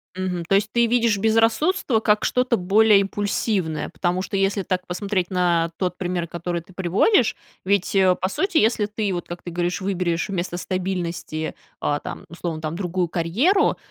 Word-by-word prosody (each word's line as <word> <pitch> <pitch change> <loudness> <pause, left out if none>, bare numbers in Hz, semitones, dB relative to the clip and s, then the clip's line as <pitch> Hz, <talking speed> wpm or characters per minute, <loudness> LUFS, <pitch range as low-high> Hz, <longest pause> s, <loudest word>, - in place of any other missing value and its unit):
Мгм. 185 -2 -2
То 195 - +2
есть, 205 +2 +2
ты 235 0 +3
видишь 230 -3 +2
безрассудство 225 - +2
как 210 -1 +2
что-то 250 -1 +2
более 205 +3 +5
импульсивное, 195 -5 -1
потому 175 +3 -1
что 195 - -3
если 195 +1 +1
так 185 0 -2
посмотреть 185 0 -2
на 170 -2 +1
тот 180 -1 -2
пример, 180 -2 -2
который 170 +1 -4
ты 180 - -19
приводишь, 195 - +2 0.3
ведь, 200 0 +1 0.2
по 185 - +1
сути, 380 - 0
если 220 -3 +3
ты, 210 -1 -2
вот 175 -1 -4
как 175 0 -7
ты - - -7
говоришь, 175 +2 -1
выберешь 180 -1 -1
вместо 175 -2 -3
стабильности, 175 -4 -3 0.3
э, 145 0 0
там, - - -7
условно 170 -1 -5
там, 155 0 -3
другую 180 -1 -1
карьеру, 220 - +2
185 Hz, 170 wpm, -23 LUFS, 175-210 Hz, 0.3 s, более